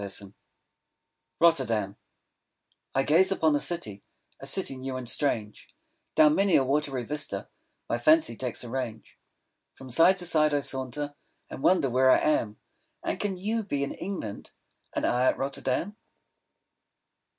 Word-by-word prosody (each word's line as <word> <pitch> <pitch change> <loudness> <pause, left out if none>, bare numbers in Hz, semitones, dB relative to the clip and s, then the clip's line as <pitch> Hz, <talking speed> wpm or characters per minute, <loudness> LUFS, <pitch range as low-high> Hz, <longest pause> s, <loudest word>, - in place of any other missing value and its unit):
_ 100 0 -5 1.1
ROTTERDAM 115 - +2 1.0
I 135 - +3
gaze 180 +7 +4
upon 160 -5 +2
a - - +2
city, 110 - -3 0.4
A 135 - -7
city 140 -1 -1
new 130 0 -5
and 125 -2 -6
strange; 115 -6 -2 0.5
Down 150 -1 +6
many 195 +1 +3
a 135 - +5
watery 135 -1 -1
vista 145 +4 -3 0.4
My 120 - -1
fancy 155 -2 +4
takes 125 0 -4
a 120 - -8
range; 120 -3 -6 0.6
From 130 -1 -11
side 170 +8 +5
to 180 - -1
side 155 -3 +3
I 145 - +1
saunter, 135 +2 -2 0.4
5 - - -24
And - - -7
wonder 180 -4 +3
where 130 +1 +3
I - - +7
am; 115 -9 0 0.4
And - - -2
can 200 -3 -2
you 220 +4 -2
be 145 -8 -2
in 140 - -3
England, 175 - -6 0.4
And - - -2
I 125 +1 +2
at - - +2
Rotterdam! 135 +7 -2
135 Hz, 150 wpm, -27 LUFS, 125-165 Hz, 1.1 s, I